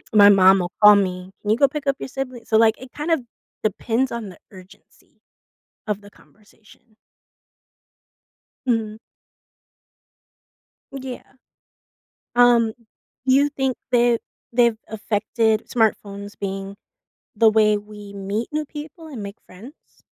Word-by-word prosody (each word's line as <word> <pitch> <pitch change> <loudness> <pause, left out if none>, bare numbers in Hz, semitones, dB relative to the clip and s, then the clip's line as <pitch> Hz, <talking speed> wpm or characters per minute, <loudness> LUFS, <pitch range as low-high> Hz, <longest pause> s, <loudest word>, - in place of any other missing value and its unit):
My 205 -1 +9
mom 195 -1 +6
will 175 0 -3
call 210 0 +9
me, 185 -2 -1
"Can 205 - -5
you 215 - +3
go 280 - +5
pick 295 0 -6
up 275 - +2
your - - -5
sibling?" 255 -3 -6
So, 220 - -1
like, 220 0 +4
it 260 0 -12
kind 300 +3 -4
of 325 -4 +2 0.4
depends 230 +5 0
on 235 -3 -5
the 180 - -13
urgency 190 +1 -18 0.7
of 210 -1 -3
the 205 - -14
conversation. 215 +2 -23 1.7
Mhm. 225 -3 0 2.0
Yeah. 260 -2 -7 1.1
Um, 240 -2 +5 0.5
you 275 +2 +4
think 265 -3 -1 0.2
that 240 -1 +3 0.3
they've 235 -2 +3
affected 220 +1 -1
smartphones 205 -3 -1
being 195 0 -5 0.6
the 220 +1 +5
way 215 -1 +3
we 205 -1 -11
meet 200 +3 -3
new 305 0 -2
people 315 +3 -10
and 255 -9 -7
make 200 +2 -8
friends? 230 - -16
220 Hz, 130 wpm, -22 LUFS, 205-255 Hz, 2.0 s, My